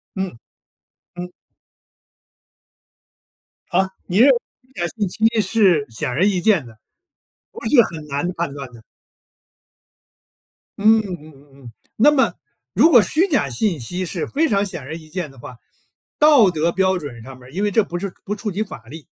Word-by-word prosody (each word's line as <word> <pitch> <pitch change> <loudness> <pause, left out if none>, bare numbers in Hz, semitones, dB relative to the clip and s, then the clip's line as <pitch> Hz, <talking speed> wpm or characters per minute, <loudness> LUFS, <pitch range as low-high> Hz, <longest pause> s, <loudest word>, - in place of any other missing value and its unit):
嗯， 190 - -4 0.8
嗯。 180 0 -7 2.4
啊？ 190 +1 +1 0.2
你 180 - -1
认 260 +5 +7
为 260 - +5 0.3
虚 265 - -29
假 175 - +1
信 205 -4 0
息 225 +3 +2
是 190 -7 +3
显 120 +6 -3
而 145 +10 +1
易 195 -3 +1
见 190 - +3
的， 115 -2 -15 0.7
不 - - -10
是 250 -2 +7
很 160 -6 -7
难 145 +3 -2
判 170 -5 -3
断 140 -3 -8
的。 115 -2 -15 2.0
嗯 220 +2 +5
嗯 195 -5 -5
嗯 145 -2 -16 0.2
嗯， 120 - -10 0.3
那 285 +7 +6
么， 275 -3 +2 0.4
如 325 - +5
果 245 -8 +7
虚 320 - +1
假 270 - +1
信 165 - -1
息 180 +10 -4
是 - - -3
非 315 +3 +1
常 200 -2 +2
显 175 -5 -6
而 135 +5 -7
易 160 -1 -12
见 175 -2 -4
的 135 - -19
话， 125 0 -11 0.6
道 290 -9 +6
德 165 -1 0
标 190 +1 +1
准 140 -8 -8
上 135 +2 -10
面 125 - -16
儿 130 - -15
因 195 +4 -2
为 205 - +1
这 220 +2 +3
不 175 -2 -5
是 195 -1 -5
不 205 - -3
触 210 0 -4
及 200 +4 -1
法 160 - -11
律， 150 +4 -11
180 Hz, 190 characters per minute, -20 LUFS, 145-215 Hz, 2.4 s, 认